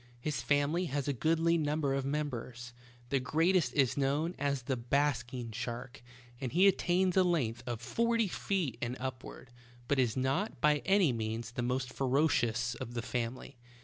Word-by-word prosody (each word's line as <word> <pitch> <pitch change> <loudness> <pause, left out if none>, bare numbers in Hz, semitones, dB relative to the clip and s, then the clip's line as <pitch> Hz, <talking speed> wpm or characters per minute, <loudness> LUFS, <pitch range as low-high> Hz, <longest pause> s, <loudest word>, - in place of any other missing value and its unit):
His 150 +4 -2
family 145 +5 +1
has 145 -3 -2
a 145 - +1
goodly 165 +5 +2
number 150 -2 0
of 135 -1 -1
members. 125 -4 -4 0.4
The 135 - +3
greatest 160 +2 +2
is 135 -4 +3
known 145 +5 0
as 140 -2 -1
the 130 +2 -1
''basking 125 -2 -1
shark," 120 +2 -5 0.4
and 130 -3 -3
he 185 +4 +5
attains 185 -1 +2
a 190 - +6
length 130 -10 0
of 120 -2 -3
forty 230 - +1
feet 180 - -2
and 120 +1 -2
upward, 130 -1 -7 0.4
but 140 +1 +1
is 120 -1 +1
not, 135 +12 -1
by 150 0 +3
any 190 -8 +4
means, 110 0 -3
the 120 - -3
most 125 +1 -2
ferocious 125 -4 +1
of 120 0 -7
the 120 - -2
fam 120 0 -2
ily. 130 0 -12
135 Hz, 170 wpm, -32 LUFS, 120-160 Hz, 0.4 s, a